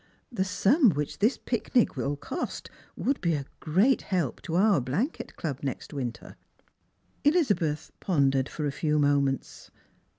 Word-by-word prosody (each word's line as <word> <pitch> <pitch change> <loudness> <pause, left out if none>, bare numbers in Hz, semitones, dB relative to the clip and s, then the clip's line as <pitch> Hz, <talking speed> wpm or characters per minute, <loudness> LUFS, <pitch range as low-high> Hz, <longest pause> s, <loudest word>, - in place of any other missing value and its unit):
'fhe 190 - +1
sum 210 - +4
which 150 -4 -2
thLs 220 +6 +3
picnic 235 0 +1
will 140 +2 -1
cost 145 - -5 0.2
would 275 - -1
be 170 -3 +1
a 140 -2 -4
great 195 - +3
help 175 - -2
to 165 - -4
our 195 -4 +4
blanket 180 - -3
club 140 -5 -4
next 140 +2 -5
winter." 125 -5 -5 0.9
Elizabeth 205 - +1
pondered 135 -6 +2
for 155 - -4
a 145 - 0
few 150 +2 0
moments. 140 -2 0
160 Hz, 140 wpm, -28 LUFS, 140-210 Hz, 0.9 s, sum